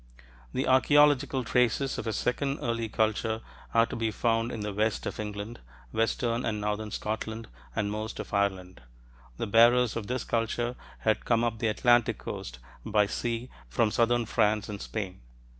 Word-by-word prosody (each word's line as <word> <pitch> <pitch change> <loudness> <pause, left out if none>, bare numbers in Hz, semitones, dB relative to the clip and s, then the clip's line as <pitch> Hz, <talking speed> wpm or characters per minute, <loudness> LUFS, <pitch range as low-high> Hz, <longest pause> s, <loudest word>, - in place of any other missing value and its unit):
The - - -1
archeological 140 0 +4
traces 125 +3 +1
of - - -5
a - - +1
second 135 +5 -1
early 115 -1 -1
culture 110 +1 0 0.3
are 115 0 +5
to - - -6
be 115 -1 0
found 115 +2 0
in 110 - -5
the 105 -1 -3
west 110 +2 0
of - - -4
England, 105 +2 -5 0.3
western 115 +1 0
and 110 -2 -1
northern 105 +1 -2
Scotland, 110 +2 -4 0.3
and 105 -2 0
most 110 +1 -4
of - - -7
Ireland. 95 -4 -1 0.6
The - - -2
bearers 120 +2 +5
of 115 -3 -4
this 125 -1 -2
culture 120 +1 -1 0.3
had 110 -1 +1
come 115 -1 +2
up 115 -2 -1
the 115 - +1
Atlantic 120 +2 +3
coast 60 +1 -6 0.3
by 105 -2 +3
sea 115 +4 -3 0.2
from 105 - +2
southern 120 +1 +2
France 105 0 +1
and 100 -1 -5
Spain. 95 - -5
115 Hz, 165 wpm, -28 LUFS, 105-120 Hz, 0.6 s, are